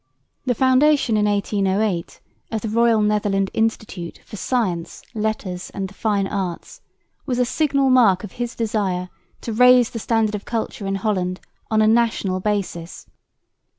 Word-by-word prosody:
The 245 - +2
foundation 260 -1 +3
in 210 0 +2
1808 200 -2 0 0.3
of 220 -1 -2
the 220 - -3
"Royal 230 0 +3
Netherland 205 -2 +1
Institute 215 -6 -2
for - - -10
Science, 190 -6 -2
Letters 210 -5 -3
and 195 -1 -2
the 195 - -15
Fine 200 -1 0
Arts" 195 - -4 0.5
was 250 -3 -1
a 250 - +3
signal 275 0 +1
mark 215 -8 +5
of 210 - -7
his 240 0 -5
desire 195 -5 -1 0.3
to 230 - -4
raise 250 +1 +6
the 230 - -5
standard 225 -1 +1
of 210 -1 -4
culture 225 -2 -4
in 195 - -1
Holland 185 -3 -1 0.3
on 215 -1 +3
a - - +4
national 220 -5 +2
basis. 185 -4 -3
215 Hz, 150 wpm, -21 LUFS, 195-235 Hz, 0.5 s, raise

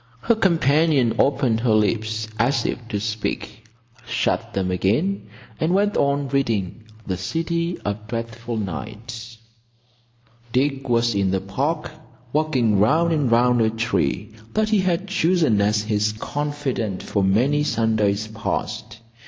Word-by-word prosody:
Her 235 - +3
companion 160 - +3
opened 135 -5 +2
her 115 -2 +2
lips 110 +1 0
as 120 +1 +2
if 120 - -3
to 105 -3 -2
speak, 105 +1 -4 0.4
shut - - -1
them 95 -1 0
again, 115 - 0 0.3
and 165 +4 +1
went 205 +1 +2
on 140 0 +1
reading 115 -6 -1 0.2
The 95 -2 -2
City 170 - -2
of 105 +1 -3
Dreadful 115 0 -4
Night. 110 +4 -6 1.1
Dick 135 +1 0
was 120 -1 +2
in 100 -1 +1
the 95 0 +1
Park, 135 - -2 0.4
walking 130 -9 +2
round 160 +11 +3
and 145 -5 +1
round 120 0 +4
a 110 - +3
tree 110 - -1 0.2
that 215 0 +2
he 215 -2 +3
had 185 0 0
chosen 170 - +2
as 105 +1 +2
his 105 -1 0
confidante 135 -5 -3
for 100 - 0
many 125 +10 +3
Sundays 110 -5 +1
past. 110 0 -4
115 Hz, 135 wpm, -22 LUFS, 105-145 Hz, 1.1 s, round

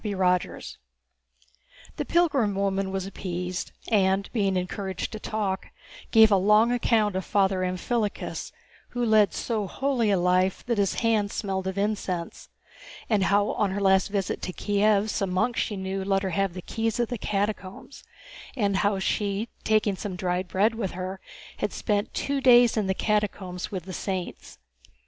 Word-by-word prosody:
CHAPTER 205 -3 -3
XIV 180 -1 0 1.2
The - - -2
pilgrim 285 - +2
woman 195 0 0
was 190 -1 -3
appeased 180 -2 -4 0.2
and, 195 -2 +2
being 195 -5 +1
encouraged 190 +1 -3
to 215 - -6
talk, 205 -3 -2 0.4
gave 220 -2 +6
a 200 - +6
long 210 +5 +4
account 225 -4 +2
of 190 - -1
Father 195 -1 +1
Amphilochus, 205 +4 -2 0.4
who 245 -1 -2
led 215 -3 +4
so 215 -4 -2
holy 260 -1 0
a 200 - +3
life 180 +1 +1
that 235 -3 0
his 200 -2 +1
hands 220 -3 +1
smelled 190 -2 -2
of 190 +1 -3
incense, 200 -4 -3 0.6
and 200 -3 +3
how 205 +1 +2
on 205 - 0
her 190 +2 -2
last 190 -1 +3
visit 200 -2 -2
to - - -3
Kiev 205 +1 +2
some 195 -3 -1
monks 215 +6 +1
she 205 - -3
knew 190 0 -3
let 195 0 +1
her 190 - -2
have 195 -1 0
the 185 - -6
keys 225 0 -2
of 240 - +1
the 245 - -4
catacombs, 205 +4 -3 0.5
and 200 -6 +1
how 205 0 +1
she, 200 +3 -1
taking 215 -2 +2
some 190 0 -5
dried 180 0 -1
bread 205 +5 +2
with 225 -5 -3
her, 185 +1 -5 0.4
had - - -2
spent 205 -1 -1
two 280 -1 -1
days 245 -2 +6
in 215 -3 0
the 190 - 0
catacombs 200 -4 -1
with 185 -4 -4
the 185 +1 -8
saints. 185 -1 -5
200 Hz, 170 wpm, -26 LUFS, 190-215 Hz, 1.2 s, gave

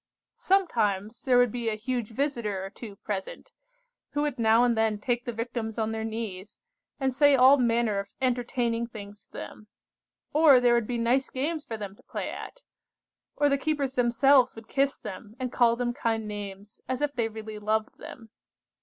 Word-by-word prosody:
"Sometimes 225 - +1
there 255 -2 +4
would 245 -2 +4
be 235 -1 -2
a 215 - -1
huge 240 0 -3
visitor 225 -6 -2
or 195 - -8
two 215 -2 -10
present, 195 -1 -6 0.6
who 290 - 0
would 290 -4 -2
now 225 +1 +5
and 240 -1 +3
then 220 -1 +1
take 240 +3 -2
the 240 - -2
Victims 230 -1 -4
on 220 -1 -1
their 220 0 -3
knees, 220 -3 -6 0.4
and 265 -1 0
say 285 +1 +5
all 260 +2 +7
manner 235 -4 +1
of 200 0 -8
entertaining 240 -2 0
things 205 -3 -11
to - - -40
them. 215 - -9 0.7
Or 295 -4 +7
there 245 -1 +4
would 235 -3 +1
be 245 - -2
nice 245 +3 +1
games 295 +4 -2
for 230 -7 -6
them 200 -2 -7
to - - -22
play - - -5
at. - - -9 0.7
Or 290 - +3
the 280 -1 +2
keepers 285 -3 -1
themselves 250 +1 +4
would 225 -1 -11
kiss 275 +2 +1
them, 210 +2 -9
and 255 -1 -3
call 235 -2 +4
them 240 0 -1
kind 225 -4 -1
names, 205 -1 -8
as 260 +2 -2
if 290 -1 0
they 230 -4 0
really 220 -1 -8
loved 215 +1 -1
them. 225 -3 -11
235 Hz, 190 wpm, -27 LUFS, 215-260 Hz, 0.7 s, all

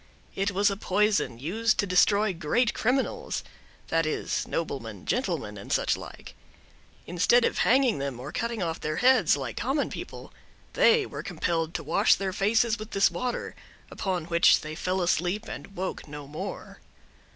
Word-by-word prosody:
It 195 +1 0
was 200 +1 +2
a 200 - -4
poison, 205 - +1
used 215 - 0
to - - +1
destroy 200 +2 +3
great 175 +9 +1
criminals—that 255 - -2
is, 155 - -2
noblemen, 115 - -4
gentlemen, - - -2
and - - -9
such - - +2
like. - - -10 0.7
Instead 200 +8 +3
of - - -1
hanging 255 - +3
them 135 -3 -4
or 135 +4 -7
cutting 230 +5 -3 0.2
their 155 0 -2
heads 250 - +4
off, 145 - -5
like 120 -3 -5
common 275 +3 -1
people, - - -8 0.4
they 460 -3 +4
were - - -7
compelled 165 -3 -2
to 165 - -3
wash 155 +3 +4
their 190 -1 -3
faces 220 +3 +2
with 215 0 -7
this 195 - +4
water; 240 +8 -3 0.4
upon 185 -4 -2
which 170 0 +4
they 155 0 -6
fell 185 +3 -1
asleep, 180 +5 0
and 200 - -8
woke 190 -3 -4
no 145 -1 -8
more. 145 +2 -7
190 Hz, 160 wpm, -27 LUFS, 160-225 Hz, 0.7 s, heads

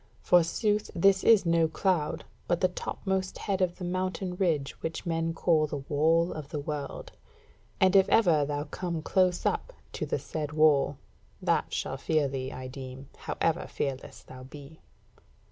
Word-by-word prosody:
Forsooth 205 +5 +2
this 195 +2 +4
is 220 -5 +6
no 165 -1 +3
cloud, 160 -1 -1 0.2
but 175 -1 +1
the 185 - +3
topmost 190 +1 -3
head 195 -2 -2
of 180 -1 +1
the 180 - -5
mountain 185 0 -2
ridge 160 -7 0
which 160 - -4
men 165 -1 0
call 165 -2 +2
the 145 - -4
Wall 165 +4 +2
of 150 -3 -7
the 150 - -3
World: 145 -1 -5 0.7
and 190 0 +4
if 190 -1 +6
ever 170 -9 +4
thou 145 0 -2
come 170 0 -4
close 180 0 +1
up - - -1 0.2
to - - -3
the - - 0
said 150 -2 -5
Wall, 150 -3 +3 0.4
that - - 0
shall 135 - -3
fear 155 +1 +1
thee, 130 -1 -4
I 130 - -7
deem, 130 +1 -8
however 165 0 -1
fearless 135 -2 -4
thou 130 0 -12
be." 140 +4 -12
165 Hz, 160 wpm, -28 LUFS, 145-185 Hz, 0.7 s, is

